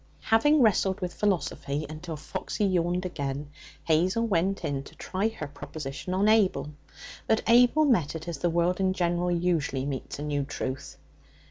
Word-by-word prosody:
Having 295 +6 +4
wrestled 195 -3 +2
with 180 -2 -4
philosophy 155 -6 -1
until 155 +1 -7
Foxy 205 +6 -3
yawned 180 -1 +1
again, 140 -4 -4 0.3
Hazel 180 +8 +2
went 195 -1 0
in 140 -1 -1
to 145 +3 -14
try 190 +6 -1
her 220 -8 -5
proposition 145 +3 -6
on 200 +2 +2
Abel. 210 -8 +3 0.6
But 220 - +2
Abel 245 +6 +5
met 175 - +2
it 160 +1 -6
as 165 -4 -4
the 175 - +1
world 175 +2 +1
in 190 -1 +2
general 175 -1 0
usually 170 -6 0
meets 140 -2 -4
a 145 - -5
new 145 -1 -1
truth. 130 -1 -5
175 Hz, 160 wpm, -27 LUFS, 150-195 Hz, 0.6 s, Abel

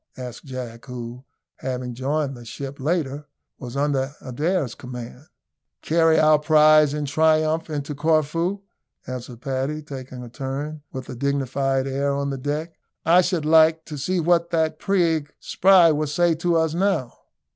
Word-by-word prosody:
asked 125 -2 -8
Jack, 125 -3 -7
who, 125 0 -7 0.3
having 125 -1 -4
joined 135 +3 -2
the 120 - -11
ship 135 +4 -7
later, 150 -1 -2 0.3
was 125 +1 -7
under 140 -1 0
Adair's 145 +1 -1
command. 125 +3 -9 0.6
"Carry 165 0 +3
our 155 -1 +5
prize 155 -1 +5
in 150 -1 -2
triumph 155 +2 +2
into 150 -1 -4
Corfu," 160 +6 0 0.4
answered 125 -1 -7
Paddy, 135 +4 -2
taking 130 -3 -8
a - - -8
turn 140 +4 -5
with 130 -2 -7
a 130 - -6
dignified 135 0 0
air 140 +1 -1
on 140 0 -2
the 135 - -3
deck. 150 +5 -4 0.3
"I 170 +3 +6
should 175 -4 -1
like, 160 0 +5
to 150 - -7
see 180 +6 0
what 170 0 +2
that 160 -2 0
prig 165 -6 0
Spry 185 -3 +5
will 155 0 0
say 170 +3 +2
to 170 +2 0
us 160 -1 +1
now." 175 -9 0
145 Hz, 155 wpm, -23 LUFS, 130-160 Hz, 0.6 s, I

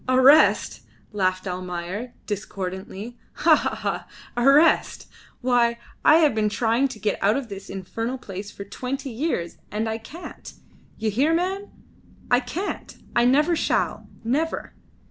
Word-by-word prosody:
"Arrest!" 265 +4 +5 0.3
laughed 185 -2 0
Almayer, 180 +5 -4
discordantly. 195 +2 -5
"Ha! - - +5
ha! - - -1
ha! - - -3 0.3
Arrest! 275 +6 +4 0.3
Why, 240 -2 +3 0.3
I 305 - +7
have 315 -3 +5
been 215 -1 +1
trying 230 +5 +2
to 250 -5 -9
get 210 0 -1
out 205 +5 +3
of 265 -4 -5
this 195 -1 -8
infernal 225 +6 -4
place 200 -4 -7
for 200 - -8
twenty 260 +6 -5
years, 225 - -2
and 215 +2 -2
I 220 0 -2
can't. 320 +10 -10 0.4
You 220 -1 -1
hear, 285 +10 +2
man! 380 +4 -1 0.6
I 245 - +6
can't, 315 +11 -5 0.2
and 240 +1 +5
never 300 +5 +3
shall! - - 0
Never!" 290 +8 -1
235 Hz, 140 wpm, -24 LUFS, 200-275 Hz, 0.6 s, I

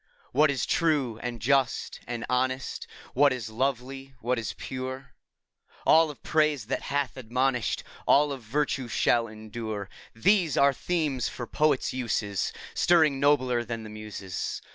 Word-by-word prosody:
What 150 +3 +4
is 140 -2 0
true 145 -9 +1
and 120 -1 -4
just 135 +2 +1
and 120 -1 -4
honest, 130 +1 -1 0.3
What 140 +2 +5
is 120 -4 -4
lovely, 135 +2 -3
what 125 +1 0
is 110 - -4
pure, 130 0 -6 0.3
— - - -30
All 160 0 +6
of 145 - -10
praise 150 -6 +2
that 125 - -2
hath 140 -2 -2
admonish'd, 125 0 0 0.2
All 145 +1 +5
of 135 -2 -5
virtue, 135 +2 -1
shall 115 0 +2
endure, 110 -1 -6 0.2
— - - -27
These 185 -8 +4
are 140 0 +5
themes 150 -5 -1
for 120 - -6
poets' 150 +1 +1
uses, 105 -6 -1 0.2
Stirring 155 -5 +4
nobler 130 -4 +3
than 115 0 -5
the 110 - -9
Muses. 105 -3 -5
130 Hz, 150 wpm, -27 LUFS, 115-140 Hz, 0.3 s, All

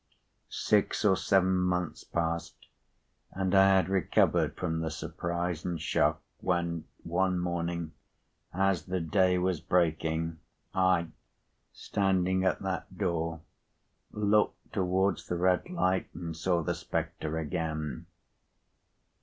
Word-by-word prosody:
Six 105 +1 +1
or 95 -2 +6
seven 95 +2 +3
months 90 -2 -1
passed, 85 -1 -2 0.8
and 95 0 -1
I 95 0 +7
had 95 -3 +3
recovered 95 -1 +2
from 80 -3 -1
the 80 0 -1
surprise 85 +1 -3
and 85 -2 -2
shock, 80 - +1 0.2
when 85 -2 -1 0.2
one 90 +2 +1
morning, 85 -2 -2 0.6
as 95 0 +1
the 95 0 -1
day 90 +2 +2
was 90 -3 0
breaking, 80 -1 0 0.3
I, 95 -3 +2 0.6
standing 95 -2 0
at 95 0 +1
that 95 -1 -4
door, 80 -2 -1 0.7
looked 105 0 +1
towards 95 0 +1
the 90 - -1
red 90 - +2
light, 95 - 0
and 85 -2 -5
saw 85 0 0
the - - 0
spectre 80 +1 -3
again." 80 -1 -3
90 Hz, 115 wpm, -30 LUFS, 85-95 Hz, 0.8 s, I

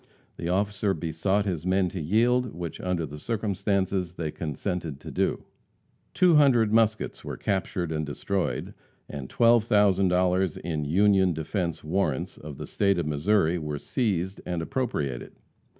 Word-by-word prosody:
The 85 - -3
officer 100 +1 0
besought 85 +6 0
his 85 -6 -2
men 95 +1 +2
to 90 - -5
yield, 120 +8 +2
which 85 -1 -6
under 90 -3 -1
the 75 +1 -9
circumstances 100 -3 -1
they 80 -3 -3
consented 80 -1 -4
to - - -8
do. - - 0 0.7
Two 180 -4 +5
hundred 120 -7 +4
muskets 110 -1 +1
were - - -5
captured 90 -3 -2
and 80 -1 -1
destroyed, 90 +6 -2 0.3
and 70 -3 -7
$12,000 95 -6 +3
in 80 -3 -3
"Union 95 +3 +4
Defence 85 +1 -3
Warrants," 75 -3 -1
of 75 -2 -9
the - - -6
State 100 -2 +1
of 85 - -1
Missouri, 80 +3 +2
were 75 -2 -4
seized 95 - -2
and 85 -2 -3
appropriated. 80 - -3
90 Hz, 140 wpm, -26 LUFS, 80-105 Hz, 0.7 s, Two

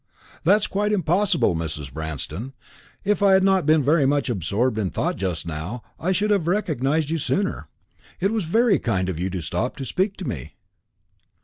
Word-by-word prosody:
"That 190 +5 +7
is 215 - +1
quite 210 +1 0
impossible, 185 - +2
Mrs. 75 -4 -5
Branston. 80 - -5 0.5
If 210 0 +1
I 200 -1 +5
had 190 0 +5
not 190 -5 +3
been 155 -1 +5
very 145 0 +3
much 140 -2 +1
absorbed 110 +4 0
in 100 -4 0
thought - - -1
just 90 -4 -3
now, 85 +9 -5 0.2
I 180 - 0
should 205 +3 +1
have 195 -6 +2
recognised 155 - 0
you 165 - 0
sooner. 195 +7 -1 0.5
It 195 +3 +1
was 220 -5 -1
very 220 +4 +3
kind 95 -5 0
of 85 -4 -3
you 90 +2 -1
to 90 -1 -4
stop 90 +10 -2
to 135 - -6
speak 190 - -1
to 190 - -6
me." 75 -2 -6
145 Hz, 190 wpm, -23 LUFS, -, 0.5 s, That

